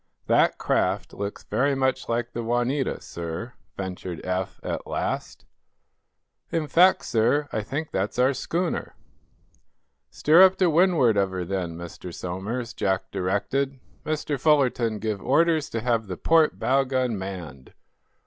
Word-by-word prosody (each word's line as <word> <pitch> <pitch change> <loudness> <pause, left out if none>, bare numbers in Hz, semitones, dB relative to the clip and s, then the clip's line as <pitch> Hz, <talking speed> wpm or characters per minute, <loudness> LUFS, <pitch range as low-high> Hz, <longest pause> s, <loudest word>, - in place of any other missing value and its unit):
"That - - +3
craft - - 0
looks 100 0 -5
very 135 +6 +1
much 130 -1 0
like 120 +1 -1
the 120 - -3
'Juanita,' 120 +4 -1
sir," 85 +8 -6 0.2
ventured 90 -2 -5
Eph, 95 0 -2
at - - -4
last. - - -3 1.1
"In 165 -2 0
fact, 180 +6 +4
sir, 125 +6 +2
I 110 - 0
think 145 +9 -4
that's 100 +6 -2
our 130 +2 +4
schooner." 170 +5 -2 1.1
"Steer 160 +4 +5
up 190 0 +7
to 180 -3 +2
windward 160 - +4
of 100 -1 +2
her, 95 -1 -4
then, 90 -3 -3
Mr. 85 +1 -8
Somers," 100 +9 -4
Jack 95 -1 -1
directed. 130 +9 -1 0.2
"Mr. 155 -2 -2
Fullerton, 125 -6 +2
give 105 -1 -3
orders 160 +2 +2
to 115 - -3
have 115 -2 0
the 90 -2 -5
port 160 -1 +3
bow 135 +1 +2
gun 130 -3 0
manned. 90 -9 -7
120 Hz, 140 wpm, -25 LUFS, 95-140 Hz, 1.1 s, up